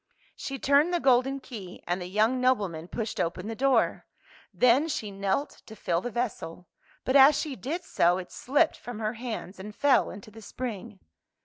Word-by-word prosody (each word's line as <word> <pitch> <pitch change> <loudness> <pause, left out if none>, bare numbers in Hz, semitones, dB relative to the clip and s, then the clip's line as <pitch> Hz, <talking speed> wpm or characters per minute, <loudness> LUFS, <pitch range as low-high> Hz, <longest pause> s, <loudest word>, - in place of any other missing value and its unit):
She 270 - -5
turned 285 +6 +3
the 350 - +1
golden 270 0 +3
key, 215 -9 -10
and 175 +1 -2
the 180 - -5
young 220 +7 +1
nobleman 200 -11 0
pushed 215 +3 -4
open 170 +4 -2
the 225 - -3
door. 260 -1 +1 0.4
Then 250 +5 +4
she 215 -9 -3
knelt 195 +8 -2
to 220 - -10
fill 175 -4 -1
the 245 - -4
vessel, 210 -7 -4 0.4
but 260 - 0
as 275 +1 +7
she 300 -4 -3
did 295 - -4
so 175 - +2
it 185 -1 -7
slipped 295 +5 +1
from 245 -2 -8
her 215 0 -2
hands 225 -5 -6
and 210 +2 -8
fell 285 0 +3
into 205 +2 -10
the 225 +1 -13
spring. 205 - -7
230 Hz, 185 wpm, -27 LUFS, 195-270 Hz, 0.4 s, as